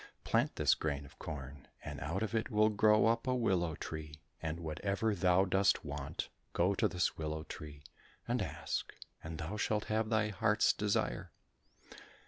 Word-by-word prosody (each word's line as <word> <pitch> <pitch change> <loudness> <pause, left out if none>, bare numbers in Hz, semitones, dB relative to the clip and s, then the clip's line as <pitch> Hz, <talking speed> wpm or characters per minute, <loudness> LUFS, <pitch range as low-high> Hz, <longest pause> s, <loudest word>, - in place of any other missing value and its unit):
Plant - - +1
this - - +4
grain 70 -2 -2
of - - -16
corn, 70 -2 -7 0.2
and - - -5
out 85 +9 -2
of 110 - -3
it 115 +1 0
will 110 -1 +4
grow 105 0 +5
up 115 +3 +2
a 130 - +2
willow 90 -9 +1
tree, 80 -2 -6 0.3
and 80 +1 -3
whatever 100 +7 -1
thou 90 0 +4
dost 95 -1 +3
want, 70 -2 -4 0.2
go 90 +3 +3
to - - +2
this 90 -2 0
willow 80 0 -3
tree 75 -2 -9 0.4
and 120 0 +1
ask, 95 - -3 0.3
and 80 0 -5
thou 85 +6 -4
shalt 105 0 +1
have 110 0 +1
thy 110 -1 +2
heart's 105 +2 +3
desire." 100 -12 0
95 Hz, 165 wpm, -34 LUFS, 80-105 Hz, 0.4 s, grow